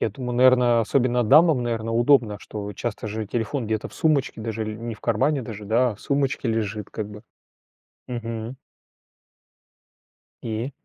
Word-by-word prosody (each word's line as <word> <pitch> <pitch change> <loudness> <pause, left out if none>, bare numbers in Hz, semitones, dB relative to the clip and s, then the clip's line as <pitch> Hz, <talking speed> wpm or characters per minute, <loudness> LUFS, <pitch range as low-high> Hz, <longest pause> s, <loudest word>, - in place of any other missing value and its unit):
Я 110 - 0
думаю, 125 +2 -5
наверно, 125 -2 +5
особенно 125 +1 +2
дамам, 150 +1 +5
наверно, 115 -1 -2
удобно, 120 -3 +3
что 105 -1 -6
часто 110 0 -4
же 110 0 -4
телефон 115 +3 -2
где-то 110 0 -2
в - - -16
сумочке 145 -7 +1
даже, 110 0 -3
или 110 0 -4
не 115 0 -5
в 105 - -18
кармане 130 +5 +1
даже, 110 -3 -8
да, 120 +4 +2
а - - -6
в - - -19
сумочке 135 -3 -1
лежит 105 -2 -2
как 105 -2 -5
бы. 105 0 -11 0.9
Мгм. 115 0 -5 1.9
И? 115 +4 -3
115 Hz, 160 wpm, -24 LUFS, 110-125 Hz, 1.9 s, наверно